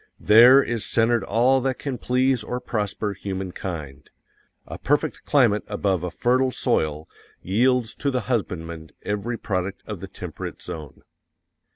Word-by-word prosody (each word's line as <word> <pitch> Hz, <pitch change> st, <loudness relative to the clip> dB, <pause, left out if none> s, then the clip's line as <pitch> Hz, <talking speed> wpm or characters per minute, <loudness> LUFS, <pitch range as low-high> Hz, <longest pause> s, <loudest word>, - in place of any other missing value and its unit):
THERE 120 Hz, +6 st, +7 dB
IS 115 Hz, -3 st, -2 dB
CENTERED 115 Hz, -1 st, +2 dB
ALL 125 Hz, +5 st, +3 dB
THAT 130 Hz, 0 st, -1 dB
CAN 135 Hz, -4 st, -4 dB
PLEASE 130 Hz, -1 st, +1 dB
OR 125 Hz, +3 st, -3 dB
PROSPER 105 Hz, -3 st, -2 dB
HUMANKIND. 90 Hz, -7 st, -6 dB, 0.6 s
A -, -, -8 dB
PERFECT 145 Hz, +1 st, 0 dB
CLIMATE 120 Hz, -8 st, +3 dB
ABOVE 100 Hz, -4 st, 0 dB
a 90 Hz, -, -2 dB
fertile 130 Hz, +7 st, +1 dB
soil_ 75 Hz, -10 st, -1 dB, 0.4 s
yields 120 Hz, +4 st, +2 dB
to 140 Hz, -, -2 dB
the 130 Hz, -2 st, -1 dB
husbandman 85 Hz, -8 st, -3 dB
every 105 Hz, +3 st, -2 dB
product 95 Hz, -2 st, -3 dB
of -, -, -6 dB
the -, -, -7 dB
temperate -, -, -7 dB
zone. 75 Hz, -4 st, -9 dB
110 Hz, 140 wpm, -24 LUFS, 95-125 Hz, 0.6 s, THERE